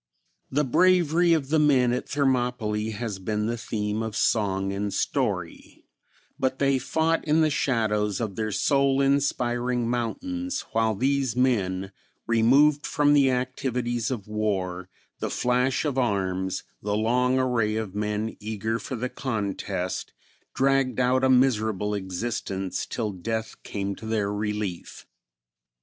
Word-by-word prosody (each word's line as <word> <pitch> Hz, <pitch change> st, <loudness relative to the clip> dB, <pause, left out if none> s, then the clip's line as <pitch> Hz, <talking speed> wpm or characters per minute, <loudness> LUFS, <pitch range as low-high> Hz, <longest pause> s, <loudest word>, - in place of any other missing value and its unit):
The 145 Hz, +3 st, +1 dB
bravery 175 Hz, +3 st, +3 dB
of 145 Hz, -5 st, 0 dB
the 160 Hz, +1 st, +3 dB
men 130 Hz, -5 st, +4 dB
at 125 Hz, -, -3 dB
Thermopylae 125 Hz, -6 st, 0 dB
has 110 Hz, -2 st, -4 dB
been 105 Hz, +2 st, -2 dB
the 115 Hz, +2 st, -1 dB
theme 105 Hz, -2 st, -3 dB
of 110 Hz, -2 st, -4 dB
song 95 Hz, -3 st, +1 dB
and 100 Hz, +1 st, -2 dB
story; -, -, -2 dB, 0.5 s
but 130 Hz, 0 st, 0 dB
they 135 Hz, -1 st, +2 dB
fought 160 Hz, +4 st, 0 dB
in 155 Hz, +1 st, +3 dB
the 155 Hz, -1 st, +3 dB
shadows 105 Hz, -7 st, 0 dB
of 110 Hz, -5 st, -3 dB
their 110 Hz, -1 st, -2 dB
soul 135 Hz, +4 st, +2 dB
inspiring 125 Hz, -3 st, +1 dB
mountains, 265 Hz, -, -2 dB
while 110 Hz, -1 st, +1 dB
these 135 Hz, +1 st, 0 dB
men, 95 Hz, -7 st, +1 dB, 0.3 s
removed 135 Hz, +6 st, +4 dB
from 145 Hz, 0 st, +3 dB
the 140 Hz, -2 st, +5 dB
activities 125 Hz, -2 st, -1 dB
of 115 Hz, -7 st, -4 dB
war, 95 Hz, -4 st, -2 dB, 0.3 s
the -, -, -2 dB
flash 125 Hz, +3 st, +1 dB
of 135 Hz, -3 st, 0 dB
arms, 95 Hz, -5 st, -1 dB, 0.2 s
the 105 Hz, 0 st, -1 dB
long 125 Hz, +4 st, +2 dB
array 120 Hz, -5 st, +1 dB
of 110 Hz, -4 st, -3 dB
men 105 Hz, +1 st, -2 dB
eager 110 Hz, +1 st, -3 dB
for 130 Hz, -, -5 dB
the 125 Hz, +2 st, -2 dB
contest, 100 Hz, -7 st, -3 dB, 0.4 s
dragged 135 Hz, -1 st, +2 dB
out 130 Hz, +1 st, +2 dB
a 130 Hz, -, +4 dB
miserable 110 Hz, -6 st, +2 dB
existence 95 Hz, -1 st, -3 dB
till 110 Hz, -4 st, -2 dB
death 110 Hz, +4 st, -4 dB
came 100 Hz, -1 st, -3 dB
to 110 Hz, -, -8 dB
their 105 Hz, -2 st, 0 dB
relief. 105 Hz, -3 st, -4 dB
115 Hz, 135 wpm, -26 LUFS, 105-130 Hz, 0.5 s, the